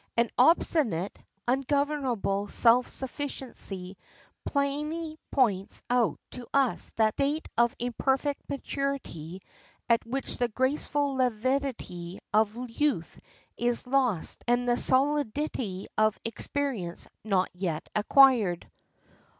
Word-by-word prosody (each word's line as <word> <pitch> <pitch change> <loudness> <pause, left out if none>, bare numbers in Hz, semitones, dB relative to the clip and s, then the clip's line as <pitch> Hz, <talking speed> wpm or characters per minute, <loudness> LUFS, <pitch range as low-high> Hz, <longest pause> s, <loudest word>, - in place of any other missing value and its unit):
An 235 -1 +2
obstinate, 250 - +3 0.3
ungovernable 265 -6 0
self 240 +3 +4
sufficiency 245 -9 -4 0.5
plainly 300 +3 -2
points 205 -8 +1
out 245 -3 +2
to 250 -1 -7
us 275 -3 +3
that 220 -1 +3
state 290 +3 -1
of 235 0 +3
imperfect 265 +4 0
maturity 270 - -4 0.5
at 235 -1 +3
which 265 +3 -3
the 245 - +2
graceful 275 +4 0
levity 250 -7 -1 0.2
of 220 +3 +1
youth 255 - -1 0.4
is 240 +1 0
lost 250 -9 0
and 245 +1 +2
the 240 - +3
solidity 260 -6 0
of 215 0 +3
experience 230 -6 -3 0.2
not 195 -4 +1
yet 180 -4 -3
acquired. 215 -5 +4
245 Hz, 100 wpm, -28 LUFS, 210-275 Hz, 0.5 s, self